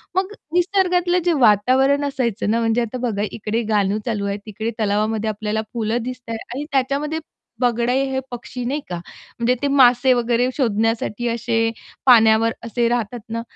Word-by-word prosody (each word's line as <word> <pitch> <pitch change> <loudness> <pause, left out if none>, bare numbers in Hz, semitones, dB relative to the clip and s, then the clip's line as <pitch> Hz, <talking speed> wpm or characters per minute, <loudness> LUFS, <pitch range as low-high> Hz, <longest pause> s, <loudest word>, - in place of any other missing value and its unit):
मग 380 +2 0 0.2
निसर्गातलं 360 -1 +2
जे 345 - +3
वातावरण 265 +7 +3
असायचं 235 -6 -1
ना, 230 - +2
म्हणजे 230 +1 +1
आता 235 +2 -3
बघा 205 -2 -2
इकडे 220 +1 -2
गाणं 205 0 +2
चालू 210 -4 -2
आहे, 200 0 -2
तिकडे 220 +2 -4
तलावामध्ये 215 +1 0
आपल्याला 215 +1 -2
फुलं 230 +1 -1
दिसतं 250 -2 -7
आहे. 225 - -3 0.2
आणि 290 +2 -4
त्याच्यामध्ये 280 +4 0 0.4
बगळे 240 0 +1 0.2
हे 265 - 0
पक्षी 245 +1 -6
नाही 285 +4 -2
का? 175 - -3 0.4
म्हणजे 235 +2 +2
ते 285 - +1
मासे 260 -2 +5
वगैरे 240 0 +1
शोधण्यासाठी 225 -1 0
असे 225 -1 0 0.3
पाण्यावर 225 -2 +6
असे 235 +1 0
राहतात 240 0 -2
ना, 230 +1 -3
235 Hz, 160 wpm, -21 LUFS, 220-260 Hz, 0.4 s, पाण्यावर